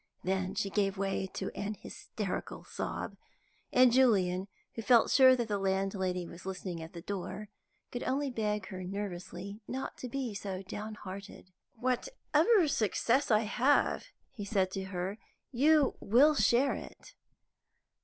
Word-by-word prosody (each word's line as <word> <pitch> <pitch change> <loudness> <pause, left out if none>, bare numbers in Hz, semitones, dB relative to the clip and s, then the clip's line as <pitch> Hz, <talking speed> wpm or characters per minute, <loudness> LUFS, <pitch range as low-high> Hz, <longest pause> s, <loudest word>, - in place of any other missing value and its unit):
Then 190 0 -1
she 200 -1 -1
gave 195 -1 +1
way 195 0 -1
to - - -3
an 210 +1 -4
hysterical 200 -1 -5
sob, - - -5 0.5
and 255 -1 +6
Julian 195 -7 +3 0.3
who 225 - -5
felt 235 0 +5
sure 260 -2 +7
that 240 -2 -2
the 205 -2 -1
landlady 190 -2 0
was 170 +1 -11
listening 185 -2 -5
at 160 +1 -9
the 170 -1 -8
door 200 +2 -5 0.4
could 245 - -4
only 275 +1 -1
beg 210 -4 -2
her 185 -1 -6
nervously 195 +1 -6
not 265 +1 -4
to 250 - -5
be 255 -3 -3
so 195 -1 -5
down 210 +3 -6
hearted. 190 -1 -9 0.2
"Whatever 330 - +2
success 240 +2 +1
I 215 -2 +5
have," 245 +6 +2 0.3
he 225 -6 -7
said 195 -2 +1
to 190 0 -4
her, 190 +2 -4 0.3
"you 290 +2 +4
will 260 +9 +5
share 270 -1 +3
it." - - -9
205 Hz, 145 wpm, -32 LUFS, 190-245 Hz, 0.5 s, sure